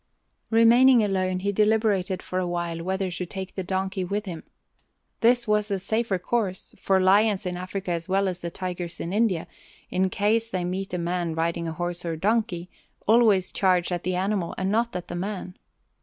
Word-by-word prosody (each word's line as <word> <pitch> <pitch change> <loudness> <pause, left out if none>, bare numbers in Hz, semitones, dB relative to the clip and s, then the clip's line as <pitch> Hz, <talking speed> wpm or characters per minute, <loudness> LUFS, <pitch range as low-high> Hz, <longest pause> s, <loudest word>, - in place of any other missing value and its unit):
Remaining 235 +2 +6
alone, 185 -2 0
he 200 +1 0
deliberated 210 -3 +1
for 185 - -2
a 180 - -1
while 170 -1 -3
whether 190 +1 -2
to 180 +1 -4
take 190 +1 -6
the 190 - -3
donkey 190 +1 -2
with 205 +4 -2
him. 170 -4 -6 0.8
This 240 0 +3
was 210 0 +2
the 200 -2 -1
safer 215 +1 -1
course, 190 0 -2
for 190 -1 +2
lions 200 +2 +3
in 180 -1 -2
Africa 185 +1 -4
as 170 +1 -3
well 195 +1 +2
as 180 -1 -3
the 170 - -4
tigers 175 -1 -5
in 170 - -4
India, 205 -6 +1 0.5
in 185 +1 +1
case 220 +4 +1
they 185 -4 -2
meet 190 +2 -3
a - - -1
man 170 -1 -2
riding 170 +1 -1
a - - -2
horse 175 +1 -3
or 165 -2 -2
donkey, 195 -1 0 0.4
always 215 -4 +4
charge 185 -2 +2
at 175 -1 -1
the 185 +1 -1
animal 190 -1 -1
and 190 +1 -1
not 230 +2 0
at 180 - -4
the 175 - -5
man. 185 0 -4
190 Hz, 190 wpm, -25 LUFS, 180-210 Hz, 0.8 s, Remaining